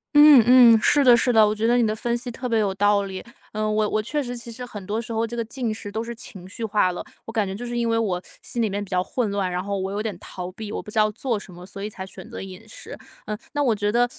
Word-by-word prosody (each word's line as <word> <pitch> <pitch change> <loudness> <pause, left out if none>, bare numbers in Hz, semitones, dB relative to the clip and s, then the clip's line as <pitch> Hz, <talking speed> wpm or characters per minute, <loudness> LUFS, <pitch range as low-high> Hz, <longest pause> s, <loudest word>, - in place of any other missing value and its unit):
嗯 295 -3 +9 0.3
嗯， 225 - +5
是 290 +4 +4
的 250 -2 +8
是 240 +1 +2
的， 220 -2 +6
我 210 - +1
觉 215 +1 0
得 240 +1 +4
你 240 - +3
的 215 0 0
分 235 +2 -1
析 245 +1 -6
特 250 +2 -5
别 230 - +2
有 200 -3 +1
道 205 +1 +3
理。 190 -1 -6 0.3
嗯， 215 0 -1
我 215 0 +2
我 215 - 0
确 290 +7 -2
实 245 -1 -5
其 235 0 -9
实 250 +2 -7
很 210 -5 -8
多 210 +2 -1
时 235 0 -6
候 225 +1 0
这 235 +1 -6
个 230 - -1
进 235 0 -3
食 205 -1 -8
都 220 +2 -3
是 235 0 -6
情 190 -5 -11
绪 225 +3 -5
化 210 -4 +2
了。 180 - -6 0.2
我 - - -7
感 220 -3 0
觉 190 - -4
就 210 +5 -6
是 240 0 -4
因 235 -1 0
为 230 - +2
我 200 -6 0 0.2
心 240 - -6
里 225 -2 +2
面 205 +1 -2
比 200 - -11
较 180 -1 +1
混 235 +2 -2
乱， 200 -2 -1
然 180 0 -2
后 200 0 -2
我 190 0 -3
有 205 +1 -2
点 215 -4 -4
逃 180 0 -7
避， 215 +1 -7
我 - - -3
不 - - -12
知 210 - -10
道 215 0 +4
做 235 +2 -2
什 190 -2 -12
么， 175 +1 -11
所 195 +2 -8
以 - - -2
才 190 - -7
选 190 -1 -11
择 - - -8
饮 195 +3 -10
食。 220 - -10 0.3
嗯， 210 0 -4 0.2
那 290 - 0
我 245 -6 +2
觉 205 0 0
得 240 +2 +2
215 Hz, 340 characters per minute, -23 LUFS, 200-235 Hz, 0.3 s, 嗯